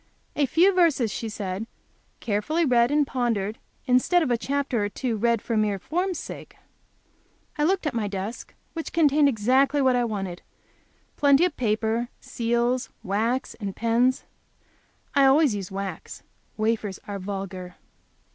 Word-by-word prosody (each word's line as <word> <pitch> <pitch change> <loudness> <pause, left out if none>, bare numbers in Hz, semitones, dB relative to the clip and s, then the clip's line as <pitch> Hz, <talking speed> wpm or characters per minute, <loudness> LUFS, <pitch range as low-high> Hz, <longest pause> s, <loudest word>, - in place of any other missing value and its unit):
"A 290 -2 +2
few 360 +8 +4
verses," 315 - +3
she 225 +2 -4
said, 205 0 -4 0.5
"carefully 270 +11 0
read 240 -3 +4
and 295 0 +3
pondered, 230 -5 -1 0.3
instead 280 +7 +3
of 265 - -1
a - - +4
chapter 270 -3 -1
or - - -2
two 240 +2 -2
read 230 +1 +1
for 230 - -2
mere 210 -2 +1
form's 360 - -2
sake." - - -9 1.0
I 295 - +1
looked 380 +1 +1
at 300 - -1
my 225 -3 -1
desk, 200 +3 -6 0.2
which 325 -1 -5
contained 295 -3 +4
exactly 260 +5 +2
what 260 -2 +3
I 245 - +2
wanted, 195 -6 -4 0.8
plenty 285 +3 +5
of 360 - -2
paper, 225 +1 0
seals, 240 +2 -1
wax 230 +6 -1
and 200 -3 -4
pens. 240 +3 +2 0.9
I 280 -1 +5
always 275 -1 +5
use 195 -3 -4
wax. 195 -3 -6 0.3
Wafers 215 -3 -1
are 200 -1 -4
vulgar. 190 -2 -6
235 Hz, 145 wpm, -25 LUFS, 210-280 Hz, 1.0 s, plenty